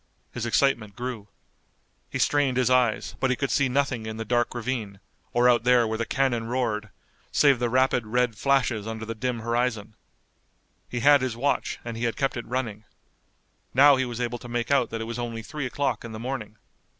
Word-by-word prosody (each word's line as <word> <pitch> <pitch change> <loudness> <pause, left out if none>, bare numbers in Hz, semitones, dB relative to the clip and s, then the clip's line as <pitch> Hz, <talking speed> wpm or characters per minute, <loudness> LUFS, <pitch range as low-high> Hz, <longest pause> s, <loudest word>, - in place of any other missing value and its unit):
His 120 -1 -4
excitement 115 -5 +1
grew. 120 -4 -5 0.8
He - - -3
strained 140 -3 +2
his 130 -1 +2
eyes, 125 -3 +2
but 130 - +1
he 125 - +2
could 140 +1 -2
see 140 -2 +2
nothing 125 -4 0
in 110 0 -5
the 115 - -4
dark 120 +1 0
ravine, 115 -5 -3 0.3
or 120 +1 +3
out 120 -2 +4
there 125 -1 +4
where 110 0 -3
the 115 - -2
cannon 130 -4 0
roared, 115 -4 -1 0.4
save 140 -4 +4
the 120 -1 0
rapid, 125 -2 +2
red 125 0 +1
flashes 125 -3 +1
under 110 0 -5
the 115 - -4
dim 120 +1 -3
horizon. 115 -2 -1 1.0
He 120 - -3
had 145 +1 +6
his 125 -3 -2
watch 140 +4 0
and 115 -1 -5
he 115 +1 -2
had 115 - -1
kept 135 -1 0
it 120 - -6
running. 115 -4 -3 0.9
Now 140 +2 +8
he 130 0 0
was 120 -1 -6
able 120 0 -2
to 120 - -10
make 120 +2 -2
out 135 -5 +3
that 115 0 -4
it - - -3
was 115 +1 -5
only 115 -2 -4
three 140 +3 -4
o'clock 130 -3 -2
in 115 -1 -8
the 110 - -6
morning. 115 -4 -5
120 Hz, 205 wpm, -26 LUFS, 115-130 Hz, 1.0 s, Now